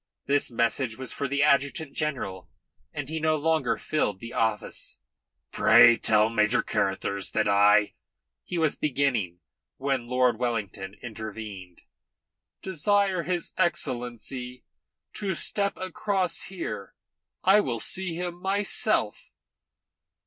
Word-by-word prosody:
This 145 0 +2
message 115 0 0
was 130 -1 -4
for 140 - -2
the 140 +1 +1
adjutant 140 +1 +1
general 125 - -3 0.4
and 145 -3 -5
he 160 +2 -3
no 155 0 +2
longer 155 -3 +1
filled 105 -11 -1
the 115 +3 -8
office. 110 -2 -2 0.5
"Pray 120 - +7
tell 110 -1 +3
Major 110 0 +2
Carruthers 100 0 -1
that 110 - +1
I 105 +1 +4 0.3
" - - -60
he 175 - -5
was 160 -3 +2
beginning, 125 - -1 0.4
when 135 -3 -1
Lord 125 -2 +2
Wellington 100 -5 -3
intervened. 110 -5 -8 0.8
"Desire 190 +1 +1
his 175 0 -3
Excellency 125 -3 -2 0.5
to 195 -4 -2
step 200 +2 0
across 185 -1 -2
here. 105 - -6 0.5
I 195 +3 +6
will 120 - -1
see 185 - -2
him 175 0 -5
myself." 195 +1 +1
130 Hz, 120 wpm, -27 LUFS, 110-165 Hz, 0.8 s, Pray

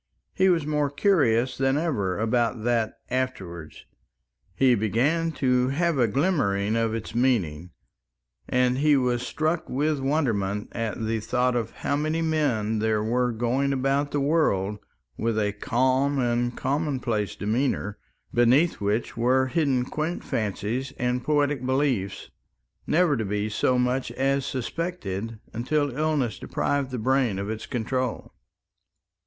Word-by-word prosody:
He 190 0 +3
was 165 -4 +2
more 150 -1 0
curious 140 - +2
than 135 +1 +2
ever 105 - -1
about 115 0 0
that 115 -2 0 0.2
"afterwards"; 95 -12 -4 0.7
he 130 -2 +4
began 130 +10 +1
to 125 -3 +2
have 160 +2 0
a 120 - +4
glimmering 110 - +1
of 115 -1 0
its 115 - -6
meaning, 95 - 0 0.8
and 125 0 +2
he 150 0 +4
was 125 -2 +1
struck 155 +5 -1
with 150 +3 0
wonderment 115 -8 0
at 115 -1 -3
the 110 0 0
thought 125 +3 0
of 115 -2 -1
how 140 - -2
many 155 +2 0
men 125 -9 0
there 110 -1 +1
were 125 +2 +1
going 120 +4 0
about 135 +2 +1
the 145 - -1
world 105 - +1 0.4
with 115 -1 -1
a 105 -1 +1
calm 130 +6 +1
and 120 -1 0
commonplace 130 - -1
demeanour 110 -1 -1 0.3
beneath 125 +5 +3
which 105 +3 -1
were 130 +3 +3
hidden 130 -2 +1
quaint 155 +6 -3
fancies 115 +5 -2
and 125 0 -1
poetic 145 -2 +1
beliefs, 130 -7 -1 0.6
never 165 -2 +3
to 115 - -1
be 105 +1 -2
so 125 +4 +1
much 125 +1 0
as 135 +1 0
suspected, 115 - -4 0.2
until 140 +3 0
illness 150 -7 0
deprived 140 -1 -1
the 130 - -4
brain 125 -3 +1
of 100 +2 -3
its 110 - -6
control. 125 +1 -3
125 Hz, 135 wpm, -25 LUFS, 110-145 Hz, 0.8 s, he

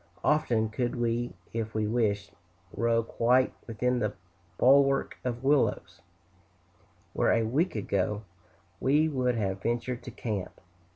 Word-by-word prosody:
Often 125 -8 +2
could 120 +3 -2
we, 120 -2 -1 0.2
if 110 -1 -3
we 110 -1 +1
wished, 105 -3 0 0.4
row 115 0 +2
quite 125 +3 +2
within 125 +2 0
the 105 -3 -1 0.4
bulwark 135 +1 +4
of 120 0 -3
willows, 140 0 +1 1.1
where - - +2
a 115 - +3
week 150 +10 0
ago 105 0 -1 0.6
we 150 +4 +3
would 125 -5 0
have 95 -3 -2
ventured 120 +2 -2
to 120 - -8
camp. 110 -5 -5
120 Hz, 125 wpm, -29 LUFS, 110-130 Hz, 1.1 s, bulwark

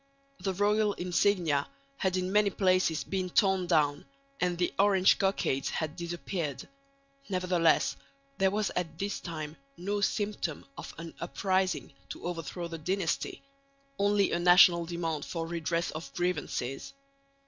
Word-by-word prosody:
The 190 0 -2
royal 210 +1 +2
insignia 175 -5 +1 0.3
had 185 -1 0
in 185 0 -1
many 210 0 +4
places 185 -6 +2
been 185 +1 -2
torn 190 -1 +2
down, 150 0 +2 0.3
and 180 -1 0
the 175 0 0
Orange 195 -2 +5
cockades 190 -8 0
had 155 -1 -3
disappeared; 170 -3 -4 0.6
nevertheless 180 -3 +2 0.4
there 190 0 +4
was 205 +1 -1
at 165 -3 -3
this 200 +3 -2
time 155 -2 -6 0.2
no 200 +4 -2
symptom 205 -7 -1
of - - -8
an 165 0 -8
uprising 185 -4 -1 0.2
to - - -8
overthrow 175 0 -4
the 165 -1 -7
dynasty, 180 +1 -2 0.6
only 200 0 +3
a 170 - +1
national 175 -1 +6
demand 165 -3 -2
for 165 -2 -4
redress 170 0 -1
of 155 +1 -7
grievances. 175 - -2
180 Hz, 135 wpm, -30 LUFS, 165-195 Hz, 0.6 s, national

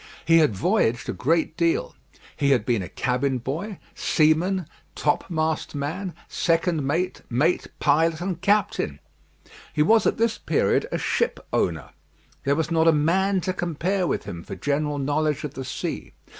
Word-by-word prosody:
He 165 +1 +6
had 150 -10 +3
voyaged 120 - +1
a - - -1
great 160 +3 0
deal. 170 -1 0 0.4
He 140 - +1
had 125 -6 +3
been 115 -4 +1
a 90 - -6
cabin 130 +1 0
boy, 165 - -4 0.2
seaman, 165 +4 +2 0.3
topmast 155 +1 -1
man, 165 +6 -3
second 165 -1 +1
mate, 165 +7 -1
mate, 145 +9 +1
pilot, 160 +2 +2
and 175 -1 -3
captain. 200 - +1 0.7
He 150 - +2
was 220 +7 +4
at - - +1
this 230 0 +1
period - - +1
a - - 0
ship 470 - 0
owner. - - 0 0.5
There 140 +1 +3
was 160 +2 -1
not 165 0 +3
a - - +8
man 185 +6 +2
to 185 - -1
compare 175 +2 -1
with - - -1
him 85 - -7
for - - -7
general 145 +8 -1
knowledge 145 +1 0
of 145 -2 -5
the 135 - -5
sea. - - -5
160 Hz, 160 wpm, -24 LUFS, 140-180 Hz, 0.7 s, a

